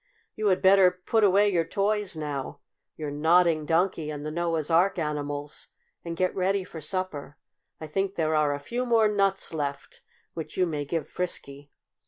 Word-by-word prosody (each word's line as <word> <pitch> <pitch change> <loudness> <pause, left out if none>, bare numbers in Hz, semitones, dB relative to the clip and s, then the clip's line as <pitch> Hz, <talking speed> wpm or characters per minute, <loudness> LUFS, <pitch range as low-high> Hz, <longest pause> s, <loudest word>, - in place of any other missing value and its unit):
You 215 - -2
had 185 -2 +2
better 190 -1 +7
put 185 +5 -1
away 205 +1 +5
your 170 -2 +2
toys 205 +1 0
now 145 -3 -5 0.4
your 150 -2 -4
Nodding 160 +1 +3
Donkey 165 -2 +1
and 150 -1 -6
the 155 - -3
Noah's 165 -1 -1
Ark 180 +4 +3
animals 145 -2 -4 0.4
and 170 -1 -5
get 185 +1 +1
ready 190 +1 0
for 165 -3 -9
supper. 155 -3 -4 0.4
I 155 - -6
think 195 +5 -2
there 160 -1 0
are 150 -2 +2
a - - -6
few 245 - -3
more 225 -2 +4
nuts 195 -3 0
left 145 -3 -5 0.3
which 160 -2 -7
you 185 - +3
may 150 -4 -3
give 165 +2 -3
Frisky." 145 -5 -4
170 Hz, 175 wpm, -26 LUFS, 150-190 Hz, 0.4 s, better